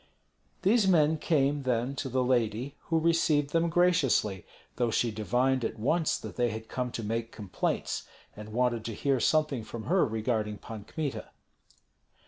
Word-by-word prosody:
These 205 Hz, +1 st, +4 dB
men 160 Hz, -4 st, +4 dB
came, 145 Hz, -3 st, +1 dB
then, 125 Hz, +1 st, -1 dB
to 135 Hz, -, -3 dB
the 130 Hz, 0 st, +1 dB
lady, 125 Hz, +2 st, 0 dB
who 165 Hz, -, +1 dB
received 160 Hz, -3 st, +2 dB
them 165 Hz, 0 st, +2 dB
graciously, 160 Hz, -, +2 dB, 0.3 s
though 120 Hz, -1 st, +1 dB
she 115 Hz, +1 st, +1 dB
divined 125 Hz, +4 st, +1 dB
at 115 Hz, -, -3 dB
once 155 Hz, +9 st, +1 dB
that -, -, -9 dB
they 120 Hz, -1 st, +2 dB
had 110 Hz, +1 st, -6 dB
come 125 Hz, -1 st, -3 dB
to 115 Hz, -, -4 dB
make 115 Hz, +2 st, -2 dB
complaints, 100 Hz, -4 st, -3 dB, 0.3 s
and 105 Hz, 0 st, -9 dB
wanted 120 Hz, -1 st, 0 dB
to 115 Hz, -, -4 dB
hear 135 Hz, +1 st, +1 dB
something 150 Hz, -2 st, +1 dB
from 110 Hz, 0 st, -7 dB
her 180 Hz, -, +3 dB
regarding 110 Hz, -3 st, -1 dB
Pan 110 Hz, 0 st, -9 dB
Kmita. 150 Hz, 0 st, -4 dB
125 Hz, 160 wpm, -29 LUFS, 115-150 Hz, 0.3 s, These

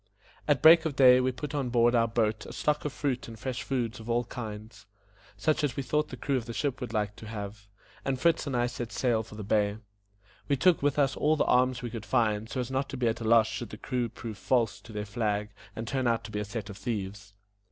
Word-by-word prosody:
At 145 Hz, -3 st, +2 dB
break 160 Hz, +1 st, +8 dB
of 155 Hz, -4 st, -1 dB
day 125 Hz, -2 st, +7 dB
we 130 Hz, +1 st, +1 dB
put 140 Hz, +3 st, -6 dB
on 140 Hz, -4 st, -1 dB
board 120 Hz, 0 st, +4 dB
our 115 Hz, -1 st, +4 dB
boat 110 Hz, -1 st, 0 dB
a -, -, -8 dB
stock 150 Hz, 0 st, 0 dB
of 150 Hz, -, -1 dB
fruit 135 Hz, -3 st, -2 dB
and 115 Hz, -1 st, -9 dB
fresh 130 Hz, +3 st, -4 dB
food 120 Hz, -5 st, -2 dB
of 110 Hz, +1 st, -9 dB
all 120 Hz, +1 st, +2 dB
kinds, 110 Hz, -2 st, -8 dB, 0.5 s
such 155 Hz, +8 st, +1 dB
as 145 Hz, -4 st, 0 dB
we 140 Hz, -, -2 dB
thought 150 Hz, +4 st, 0 dB
the 130 Hz, -, -7 dB
crew 135 Hz, +3 st, 0 dB
of 120 Hz, -1 st, -5 dB
the 115 Hz, -, -6 dB
ship 140 Hz, -3 st, -1 dB
would 125 Hz, -, -4 dB
like 105 Hz, -2 st, -1 dB
to 110 Hz, -, -10 dB
have, 105 Hz, -1 st, -7 dB, 0.4 s
and 135 Hz, -1 st, -1 dB
Fritz 165 Hz, 0 st, +2 dB
and 135 Hz, -3 st, -1 dB
I 120 Hz, -, +2 dB
set 120 Hz, -1 st, -5 dB
sail 120 Hz, -4 st, +1 dB
for 110 Hz, -1 st, -11 dB
the 105 Hz, -, -6 dB
bay. 105 Hz, 0 st, +1 dB, 0.7 s
We 140 Hz, -, +2 dB
took 175 Hz, +5 st, +4 dB
with 145 Hz, 0 st, +1 dB
us 140 Hz, -3 st, +2 dB
all 155 Hz, +1 st, +2 dB
the -, -, +1 dB
arms 125 Hz, 0 st, +2 dB
we 120 Hz, -, -4 dB
could 110 Hz, -3 st, -7 dB
find, 110 Hz, -1 st, +1 dB
so 120 Hz, -, -3 dB
as 125 Hz, +1 st, -3 dB
not 135 Hz, +1 st, -1 dB
to 135 Hz, -, -5 dB
be 125 Hz, -1 st, +1 dB
at 115 Hz, +1 st, -3 dB
a -, -, -3 dB
loss 115 Hz, 0 st, +5 dB
should 120 Hz, +1 st, -5 dB
the 105 Hz, -, -8 dB
crew 125 Hz, +1 st, -2 dB
prove 110 Hz, -3 st, -8 dB
false 110 Hz, -6 st, +1 dB
to 115 Hz, -, -13 dB
their 105 Hz, -1 st, -4 dB
flag, 105 Hz, -1 st, -1 dB, 0.2 s
and 115 Hz, 0 st, -5 dB
turn 130 Hz, 0 st, 0 dB
out 115 Hz, -1 st, +1 dB
to 110 Hz, -, -8 dB
be 105 Hz, -, -2 dB
a 105 Hz, -, -2 dB
set 105 Hz, 0 st, -5 dB
of 100 Hz, -, -10 dB
thieves. 100 Hz, -2 st, -5 dB
120 Hz, 260 wpm, -29 LUFS, 110-130 Hz, 0.7 s, break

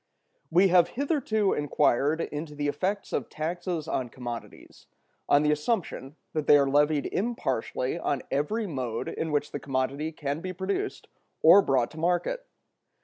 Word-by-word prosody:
We 185 Hz, +4 st, +5 dB
have 175 Hz, -1 st, +5 dB
hitherto 255 Hz, -8 st, +1 dB
inquired 145 Hz, +1 st, +2 dB
into 150 Hz, 0 st, -5 dB
the 145 Hz, 0 st, -1 dB
effects 190 Hz, +8 st, -2 dB
of -, -, -2 dB
taxes 170 Hz, 0 st, -3 dB
on 130 Hz, -6 st, -2 dB
commodities, 120 Hz, -1 st, -9 dB, 0.4 s
on 145 Hz, +1 st, +5 dB
the 150 Hz, -, +3 dB
assumption 150 Hz, -, -2 dB, 0.2 s
that 155 Hz, -2 st, -2 dB
they 145 Hz, -, +8 dB
are 140 Hz, -1 st, +3 dB
levied 145 Hz, +1 st, +2 dB
impartially 150 Hz, -, -2 dB
on 140 Hz, -5 st, -1 dB
every 180 Hz, +12 st, 0 dB
mode 130 Hz, -, -3 dB
in 160 Hz, -, -3 dB
which 145 Hz, 0 st, 0 dB
the 145 Hz, -, -4 dB
commodity 140 Hz, +3 st, -2 dB
can 150 Hz, 0 st, -4 dB
be 185 Hz, +1 st, -4 dB
produced 195 Hz, -, -3 dB, 0.4 s
or 175 Hz, +5 st, +9 dB
brought 130 Hz, -8 st, +1 dB
to 160 Hz, -, -10 dB
market. 175 Hz, -, 0 dB
155 Hz, 150 wpm, -27 LUFS, 140-185 Hz, 0.4 s, or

